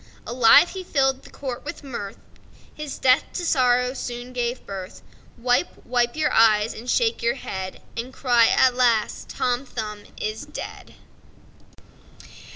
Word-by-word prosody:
Alive 240 +6 +6
he 380 -1 -6
filled 270 -5 +1
the - - -15
court 260 -3 -6
with 290 - -7
mirth; 235 -7 -6 0.6
His 300 -2 -6
death 255 0 +4
to 355 - -3
sorrow 250 -4 +2
soon 245 -1 -6
gave 245 0 -2
birth. 190 -1 -8 0.3
Wipe, 245 +7 0
wipe 240 -1 +1
your 310 -1 0
eyes, 220 -1 +4
and 240 +3 -8
shake 460 - +1
your 235 0 +1
head 190 -1 -6
And 235 +2 -5
cry,—Alas! 245 -2 +3
Tom 250 +1 -1
Thumb 215 -5 -6
is 215 +1 -3
dead! - - -8
245 Hz, 135 wpm, -23 LUFS, 230-265 Hz, 0.6 s, Alive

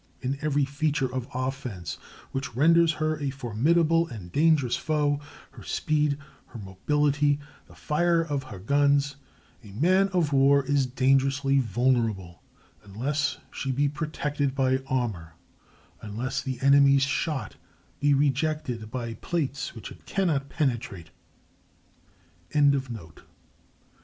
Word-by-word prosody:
In 135 +2 -2
every 145 -2 +1
feature 140 -2 -1
of 130 -2 -3
offense 125 - -4 0.3
which 135 -3 -4
renders 165 +4 +5
her 155 0 -1
a 145 -2 -1
formidable 155 +7 +1
and 100 - -9
dangerous 150 - +3
foe—her 150 -1 -3
speed, 150 -2 0 0.3
her - - -11
mobility, 145 +9 +1 0.3
the - - -17
fire 170 +3 +1
of 145 -4 -2
her 105 -7 -9
guns—a 140 +1 -1
man 185 - +3
of 175 -6 0
war 140 +1 +5
is 140 -1 +1
dangerously 135 +2 +2
vulnerable 115 -6 0 0.4
unless 130 +9 -2
she 135 - -3
be 140 +3 +1
protected 145 -2 -2
by 130 -1 +2
armor, 105 -11 -2 0.7
unless 125 +6 -3
the 130 -2 -4
enemy's 140 0 +5
shot 140 +1 -2 0.4
be 145 0 +3
rejected 140 -4 -1
by 120 -1 -4
plates 140 -1 -3
which 115 - -8
it - - -15
cannot 155 -8 0
penetrate. 115 - -2
140 Hz, 110 wpm, -26 LUFS, 125-150 Hz, 0.7 s, renders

